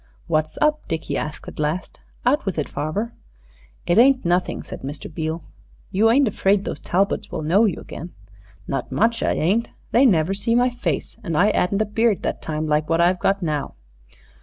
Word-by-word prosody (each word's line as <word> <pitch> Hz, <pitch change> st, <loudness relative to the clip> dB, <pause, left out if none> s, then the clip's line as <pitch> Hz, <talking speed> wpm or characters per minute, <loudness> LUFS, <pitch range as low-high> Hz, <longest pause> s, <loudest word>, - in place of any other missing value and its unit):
"What's 155 Hz, -1 st, 0 dB
up?" 305 Hz, 0 st, +1 dB
Dickie 160 Hz, -, -3 dB
asked 150 Hz, 0 st, -4 dB
at -, -, -9 dB
last. 155 Hz, +5 st, -2 dB, 0.3 s
"Out 275 Hz, +5 st, +3 dB
with 195 Hz, -4 st, -3 dB
it, 150 Hz, -, -1 dB
farver." 155 Hz, +11 st, -3 dB, 0.7 s
"It 175 Hz, -, +4 dB
ain't 260 Hz, -1 st, +5 dB
nothing," 175 Hz, +1 st, 0 dB
said -, -, -9 dB
Mr. 140 Hz, +2 st, -7 dB
Beale. 160 Hz, 0 st, -3 dB, 0.5 s
"You 210 Hz, +3 st, +4 dB
ain't 265 Hz, +3 st, +4 dB
afraid 195 Hz, -1 st, +1 dB
those -, -, -4 dB
Talbots 195 Hz, +3 st, 0 dB
will -, -, -3 dB
know 190 Hz, +9 st, +4 dB
you 200 Hz, -, -1 dB
again?" 175 Hz, -, -8 dB, 0.6 s
"Not 135 Hz, -2 st, -3 dB
much 230 Hz, +2 st, +1 dB
I -, -, +2 dB
ain't. 205 Hz, +9 st, +1 dB, 0.2 s
They 260 Hz, +4 st, +6 dB
never 175 Hz, -3 st, +2 dB
see 230 Hz, +4 st, 0 dB
my 245 Hz, +1 st, +3 dB
face; 245 Hz, -, -3 dB
and 165 Hz, -5 st, -2 dB
I 205 Hz, +5 st, +5 dB
'adn't 200 Hz, +3 st, +1 dB
a -, -, -4 dB
beard 220 Hz, 0 st, +1 dB
that -, -, -2 dB
time 155 Hz, 0 st, -3 dB
like 150 Hz, 0 st, 0 dB
what 165 Hz, 0 st, +2 dB
I've 175 Hz, +2 st, +3 dB
got 200 Hz, -1 st, +1 dB
now." 150 Hz, -3 st, -2 dB
185 Hz, 190 wpm, -22 LUFS, 155-225 Hz, 0.7 s, They